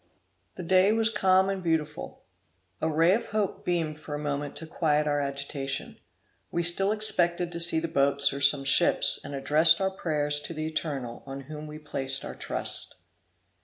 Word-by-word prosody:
The 185 - -8
day 185 +3 +3
was 225 0 +1
calm 190 -2 +2
and 195 -1 -3
beautiful. 160 -3 -4 0.6
A 160 - 0
ray 165 +4 +2
of 230 - -2
hope 215 -3 -3
beamed 160 -4 -3
for 150 -1 -7
a - - -4
moment 145 -1 -5
to 165 - -7
quiet 150 -2 -1
our 145 -1 -1
agitation. 140 -1 -5 0.5
We 170 - -2
still 195 +4 +4
expected 175 -5 +2
to 170 - -6
see 165 -1 +5
the 165 - -4
boats 140 -1 +1
or 140 - -6
some 140 0 +5
ships, 140 +1 +5
and 140 - -7
addressed 155 +6 +4
our 190 0 -1
prayers 150 -5 0
to 165 - -8
the 155 0 -4
Eternal, 140 -7 -5
on 135 0 -7
whom 150 +2 -10
we 150 0 -9
placed 135 -3 -5
our - - -7
trust. - - -4
155 Hz, 180 wpm, -26 LUFS, 145-175 Hz, 0.6 s, see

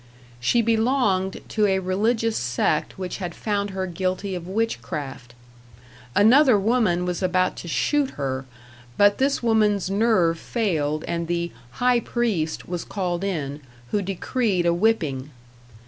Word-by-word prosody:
She 230 - +2
belonged 220 -4 +1
to 210 -2 +2
a 190 -1 +2
religious 220 +5 0
sect 120 +5 0
which 185 -2 -4
had 175 -3 -5
found 205 -2 -1
her 190 -1 -3
guilty 185 +2 -2
of 175 -1 -5
witchcraft. 135 - -4 0.8
Another 250 +3 +6
woman 200 -4 +1
was 180 0 -2
about 185 0 +1
to - - -7
shoot 285 - +1
her, 135 -1 -2 0.5
but 205 0 +4
this 275 -1 +1
woman's 210 -4 +2
nerve 195 -6 +2
failed, 155 -10 -1
and 170 -1 -2
the 170 0 -1 0.2
"high 250 - +3
priest" 210 -11 -2
was 175 -1 -3
called 180 -2 -3
in, 150 -7 -3 0.3
who 205 - +1
decreed 195 0 -1
a 170 - +3
whipping. 165 -9 0
190 Hz, 135 wpm, -24 LUFS, 170-220 Hz, 0.8 s, Another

